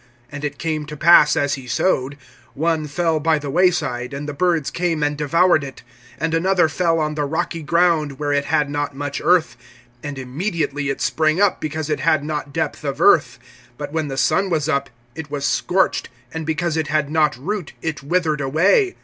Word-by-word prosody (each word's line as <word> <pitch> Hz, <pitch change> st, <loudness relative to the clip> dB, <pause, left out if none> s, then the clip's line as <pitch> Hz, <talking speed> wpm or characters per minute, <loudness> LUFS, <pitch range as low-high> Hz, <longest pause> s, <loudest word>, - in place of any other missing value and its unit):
(4)And 145 Hz, 0 st, -7 dB
it 145 Hz, -1 st, -3 dB
came 155 Hz, -2 st, -3 dB
to 150 Hz, 0 st, -8 dB
pass, 170 Hz, +2 st, +6 dB
as 145 Hz, -2 st, +1 dB
he 135 Hz, -3 st, -6 dB
sowed, 130 Hz, +2 st, 0 dB, 0.4 s
one 160 Hz, 0 st, 0 dB
fell 165 Hz, +1 st, 0 dB
by 160 Hz, +1 st, +2 dB
the 145 Hz, -2 st, -5 dB
way 180 Hz, +5 st, +5 dB
side, 125 Hz, -7 st, -3 dB
and 145 Hz, +1 st, -5 dB
the 150 Hz, -, -4 dB
birds 165 Hz, -1 st, 0 dB
came 170 Hz, -3 st, -1 dB
and 145 Hz, 0 st, 0 dB
devoured 160 Hz, +2 st, +3 dB
it. 135 Hz, -2 st, -9 dB, 0.4 s
(5)And 165 Hz, 0 st, -1 dB
another 180 Hz, +1 st, +3 dB
fell 165 Hz, 0 st, 0 dB
on 155 Hz, -1 st, -1 dB
the 150 Hz, -1 st, -2 dB
rocky 165 Hz, +3 st, -2 dB
ground, 155 Hz, -2 st, +1 dB
where 145 Hz, 0 st, -1 dB
it 140 Hz, 0 st, +1 dB
had 150 Hz, -2 st, +1 dB
not 145 Hz, -1 st, -3 dB
much 145 Hz, 0 st, -4 dB
earth; 180 Hz, -3 st, +3 dB, 0.5 s
and 145 Hz, +1 st, -6 dB
immediately 145 Hz, +1 st, -3 dB
it 135 Hz, -, -3 dB
sprang 155 Hz, +2 st, +1 dB
up, 205 Hz, -1 st, +2 dB
because 155 Hz, 0 st, -3 dB
it 150 Hz, -, -1 dB
had 155 Hz, -3 st, +2 dB
not 150 Hz, -1 st, -4 dB
depth -, -, -3 dB
of -, -, -3 dB
earth. -, -, +4 dB, 0.4 s
(6)But 145 Hz, -1 st, -6 dB
when 160 Hz, -1 st, -2 dB
the 135 Hz, -1 st, -5 dB
sun 190 Hz, +8 st, +2 dB
was 155 Hz, -4 st, 0 dB
up, 140 Hz, -3 st, 0 dB, 0.2 s
it 160 Hz, 0 st, -8 dB
was 145 Hz, -1 st, -3 dB
scorched; 185 Hz, +5 st, +1 dB, 0.2 s
and 160 Hz, -1 st, -5 dB
because 160 Hz, +1 st, -1 dB
it 160 Hz, -2 st, -1 dB
had 150 Hz, -1 st, 0 dB
not 155 Hz, -5 st, +2 dB
root, 170 Hz, +6 st, -4 dB
it 160 Hz, -2 st, -3 dB
withered 155 Hz, 0 st, 0 dB
away. 180 Hz, -, +2 dB
155 Hz, 200 wpm, -20 LUFS, 145-165 Hz, 0.5 s, pass